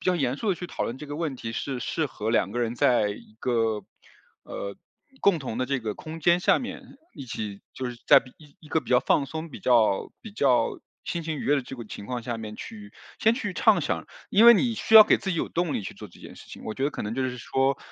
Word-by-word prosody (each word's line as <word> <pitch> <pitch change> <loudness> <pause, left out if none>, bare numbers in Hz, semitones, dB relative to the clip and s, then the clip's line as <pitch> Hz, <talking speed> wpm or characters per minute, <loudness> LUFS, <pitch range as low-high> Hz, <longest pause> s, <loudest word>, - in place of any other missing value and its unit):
比 - - -8
较 180 - +3
严 135 -4 0
肃 220 - -3
地 195 - +3
去 175 - -6
讨 - - -4
论 120 - -3
这 150 - -8
个 145 - -6
问 150 -4 -3
题 115 -2 -6
是 130 +2 -3
适 155 +5 -1
合 110 -4 -5
两 100 -4 +2
个 120 - -4
人 120 -1 -1
在 120 -3 +3
一 105 +1 -11
个， 115 -4 0 0.6
呃， 100 0 -6 0.4
共 195 -4 +4
同 130 -6 -5
的 130 - +1
这 135 +1 -1
个 110 -2 -3
空 160 +6 -8
间 170 +3 +4
下 - - +4
面 250 - -6 0.3
一 135 - -8
起 105 -4 -6
就 130 - -4
是 120 - -7
在 - - +8
比 125 - -16 0.3
一 155 - -15
个 160 - +1
比 - - -12
较 125 -1 +5
放 140 +2 +2
松、 160 +3 -6
比 145 - -10
较 115 -5 +3
比 220 - -10
较 135 - +2 0.3
心 170 - -3
情 160 -2 -4
愉 - - -5
悦 145 - +3
的 135 - -1
这 135 - -9
个 120 - -7
情 100 - -8
况 120 +2 -4
下 120 0 -3
面 110 -1 -7
去 210 -2 -9 0.3
先 225 - +4
去 210 -6 -4
畅 - - +4
想。 - - -2 0.2
因 210 +4 +5
为 235 - +11
你 235 +1 +2
需 220 - -1
要 220 - +13
给 - - +4
自 195 - -4
己 170 - -1
有 - - -1
动 175 -2 -1
力 - - -1
去 95 - -7
做 - - -9
这 - - -18
件 - - -11
事 - - -13
情， - - -10
我 110 - -4
觉 135 - -2
得 145 - +1
可 - - -7
能 105 +2 -3
就 135 - -1
是 125 -1 -3
说， 135 +3 0
135 Hz, 295 characters per minute, -26 LUFS, 115-165 Hz, 0.6 s, 要